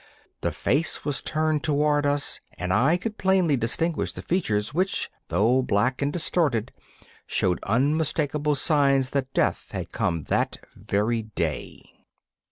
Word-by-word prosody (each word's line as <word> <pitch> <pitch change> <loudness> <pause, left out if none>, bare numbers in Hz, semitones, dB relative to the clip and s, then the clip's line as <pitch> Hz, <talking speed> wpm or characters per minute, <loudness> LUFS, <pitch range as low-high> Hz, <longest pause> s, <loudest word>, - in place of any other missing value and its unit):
The - - 0
face 155 +5 0
was 145 -2 -1
turned 155 -1 0
toward 145 -1 +2
us, 145 0 0 0.2
and 90 +1 -1
I 140 - +4
could 215 +4 -5
plainly 185 -5 +3
distinguish 150 +8 -1
the - - -8
features, 110 - 0
which, 185 +4 0 0.2
though 120 +5 +3
black 125 +3 +1
and 140 +1 +1
distorted, 150 - 0 0.6
showed 90 -2 +1
unmistakable 150 +4 +1
signs 140 -2 +2
that 135 -1 -1
death - - 0
had - - -5
come 85 -3 -1
that - - 0 0.2
very 105 +3 0
day. 85 -9 -4
140 Hz, 135 wpm, -25 LUFS, 115-155 Hz, 0.6 s, I